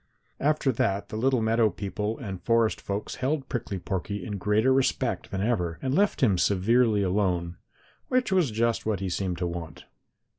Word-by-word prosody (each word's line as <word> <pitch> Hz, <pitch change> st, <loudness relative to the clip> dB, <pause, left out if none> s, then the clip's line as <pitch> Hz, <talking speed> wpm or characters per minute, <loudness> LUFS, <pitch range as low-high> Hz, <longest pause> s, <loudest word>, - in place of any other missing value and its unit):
After 150 Hz, -1 st, +2 dB
that 100 Hz, -4 st, -1 dB
the -, -, -6 dB
little 125 Hz, +1 st, +1 dB
meadow 110 Hz, 0 st, +3 dB
people 105 Hz, +2 st, -3 dB
and 95 Hz, -8 st, -6 dB
forest 115 Hz, +2 st, +2 dB
folks 100 Hz, +1 st, -4 dB
held 135 Hz, +1 st, -1 dB
Prickly 110 Hz, -5 st, -3 dB
Porky 95 Hz, +2 st, -4 dB
in 105 Hz, -2 st, -4 dB
greater 105 Hz, +6 st, +3 dB
respect 135 Hz, 0 st, 0 dB
than 95 Hz, -, -3 dB
ever 90 Hz, -7 st, 0 dB
and 130 Hz, 0 st, -2 dB
left 200 Hz, +6 st, +2 dB
him 100 Hz, -7 st, +3 dB
severely 105 Hz, +3 st, +3 dB
alone, 90 Hz, -3 st, 0 dB, 0.5 s
which 255 Hz, -4 st, +1 dB
was 180 Hz, -7 st, +3 dB
just 115 Hz, +1 st, 0 dB
what 110 Hz, -4 st, -1 dB
he 95 Hz, -1 st, -2 dB
seemed 90 Hz, -1 st, -2 dB
to 90 Hz, -, -2 dB
want. 85 Hz, -2 st, -6 dB
105 Hz, 175 wpm, -27 LUFS, 95-125 Hz, 0.5 s, meadow